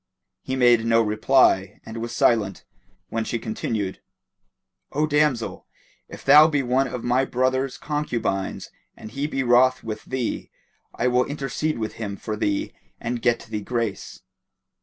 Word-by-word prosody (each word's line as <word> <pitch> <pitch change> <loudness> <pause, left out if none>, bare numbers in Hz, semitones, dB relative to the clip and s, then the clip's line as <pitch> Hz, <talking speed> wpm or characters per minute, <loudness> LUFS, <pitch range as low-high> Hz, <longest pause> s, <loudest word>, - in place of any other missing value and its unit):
He 130 - -3
made 120 -3 +4
no 115 0 +3
reply, 105 -3 +3
and 110 - -8
was 115 +1 -4
silent, 110 -5 +1 0.4
when 115 0 -1
she 115 - -2
continued, 110 -3 -3 0.9
"O 150 +2 +2
damsel! 150 -6 0 0.4
if - - -11
thou 150 +3 +8
be 145 -3 0
one 130 +2 +1
of 125 -1 -6
my 125 +2 +2
brother's 130 +1 0
concubines 120 -10 -3 0.3
and 110 - -10
he 140 +2 -2
be 135 -3 -2
wroth 125 +1 +4
with 110 -1 -6
thee, 130 -3 -3 0.5
I 125 - 0
will 125 0 +3
intercede 145 +1 -2
with 110 -1 -3
him 100 -2 -4
for 110 - -4
thee 100 -1 -1 0.3
and 120 0 -3
get 120 0 +2
thee 110 -1 -5
grace." 115 -1 -4
120 Hz, 150 wpm, -23 LUFS, 110-130 Hz, 0.9 s, thou